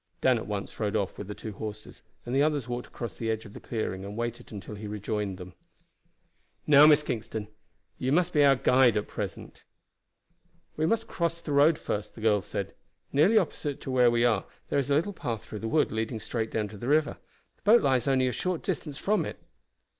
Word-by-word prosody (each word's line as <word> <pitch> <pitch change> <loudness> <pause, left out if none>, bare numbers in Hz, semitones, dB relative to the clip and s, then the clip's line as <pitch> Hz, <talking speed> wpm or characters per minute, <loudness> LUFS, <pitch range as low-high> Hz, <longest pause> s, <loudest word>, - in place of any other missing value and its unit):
Dan 130 -3 +3
at - - -7
once 100 -1 -5
rode 105 -1 -1
off 100 -3 -1
with 100 - -6
the 105 - -6
two 110 - -7
horses, 105 +1 -8 0.2
and 120 - -4
the 135 - +3
others 145 -5 +1
walked 120 0 -4
across 120 - -6
to - - -18
the 115 - -2
edge 110 0 -2
of 100 - -12
the - - -9
clearing 110 -5 -3
and 100 +2 -7
waited 120 0 -4
until 100 -1 -7
he 105 0 -7
rejoined 105 -1 -3
them. 90 -1 -10 1.1
"Now, 150 0 +8
Miss 150 -1 +6
Kingston, 110 -4 -4 0.5
you 130 - 0
must 170 +3 +2
be 150 - +5
our 140 -1 +6
guide 125 -3 +4
at 105 - -2
present." - - -6 1.1
"We 155 +1 +1
must 225 +3 0
cross 170 -3 -1
the 160 - -6
road 145 +3 +5
first," 105 0 -4
the 110 - -10
girl 105 -2 +3
said. 100 +1 -5 0.4
"Nearly 160 +11 +5
opposite 150 -6 -1
to 135 - -5
where 125 -2 +5
we 120 0 +2
are 110 -5 +2 0.2
there 145 - +2
is 140 0 -2
a 140 - +3
little 170 +7 +1
path 115 - -4
through 105 - -7
the 115 - -4
wood 155 +6 +2
leading 110 +1 -2
straight 110 +1 -3
down 110 -2 -1
to 105 - -10
the 120 - -5
river. 150 +1 +2 0.4
The - - -34
boat 225 +3 +5
lies 130 -3 +2
only 130 -1 +3
a - - 0
short 180 +5 -2
distance 145 -4 -3
from 205 -1 +1
it." - - -6
120 Hz, 220 wpm, -28 LUFS, 105-145 Hz, 1.1 s, Now